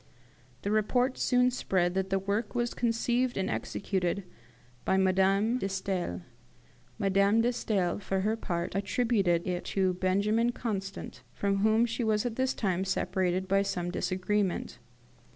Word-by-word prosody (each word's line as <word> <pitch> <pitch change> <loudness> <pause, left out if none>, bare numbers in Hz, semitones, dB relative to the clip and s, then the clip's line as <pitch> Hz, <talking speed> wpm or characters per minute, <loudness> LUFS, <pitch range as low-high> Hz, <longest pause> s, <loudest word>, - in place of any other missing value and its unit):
The 200 - -1
report 245 +5 +1
soon 250 0 +3
spread 180 -7 0
that 190 0 -1
the 195 - +2
work 205 +4 -2
was 240 -1 0
conceived 240 +1 0
and 190 0 -1
executed 190 -1 -2 0.6
by 190 - +2
Madame 195 +5 +3
de 195 - -2
Stael. 185 - -3 0.7
Madame 200 +1 +3
de 240 +2 +1
Stael, 195 -7 0
for 195 -1 -1
her 215 +3 +1
part, 175 -6 -3
attributed 195 -4 +1
it 180 -1 -2
to 190 -2 +1
Benjamin 205 +6 +1
Constant, 195 -5 -5
from 200 -1 0
whom 220 +3 +3
she 235 +1 -2
was 215 0 +1
at 235 -2 -2
this 260 +1 0
time 190 -3 0
separated 185 -1 0
by 195 +1 +3
some 175 -3 -2
disagreement. 185 - -1
195 Hz, 145 wpm, -29 LUFS, 190-225 Hz, 0.7 s, soon